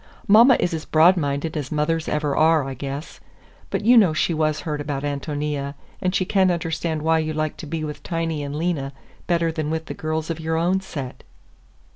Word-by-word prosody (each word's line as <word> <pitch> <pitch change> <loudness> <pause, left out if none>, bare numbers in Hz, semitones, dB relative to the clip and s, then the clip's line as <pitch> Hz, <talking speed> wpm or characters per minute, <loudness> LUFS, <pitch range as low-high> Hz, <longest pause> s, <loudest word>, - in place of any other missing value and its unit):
"Mama 230 +5 +7
is 175 - 0
as 160 -1 -3
broad 165 +4 +5
minded 145 0 -2
as 145 -4 -4
mothers 155 +1 0
ever 150 -2 0
are, 160 -1 +4
I 135 0 -5
guess. 140 +4 -6 0.5
But - - -2
you 245 +2 +7
know 190 -8 +5
she 160 +2 +1
was 155 -1 0
hurt 150 -2 -3
about 145 -1 -3
Ántonia, 145 0 -3 0.3
and 185 +1 0
she 185 - +1
can't 190 -1 +3
understand 165 -2 -2
why 160 0 +3
you 155 0 -2
like 155 0 -2
to 160 - -8
be 160 +1 -3
with 150 -1 -6
Tiny 165 -3 -2
and 140 0 -5
Lena 150 -4 -2 0.3
better 170 -1 +1
than 155 -2 -3
with 160 0 -2
the - - -6
girls 155 +1 -3
of 165 - -4
your 160 0 -1
own 180 +3 +2
set." 140 -9 -7
155 Hz, 205 wpm, -23 LUFS, 150-165 Hz, 0.5 s, Mama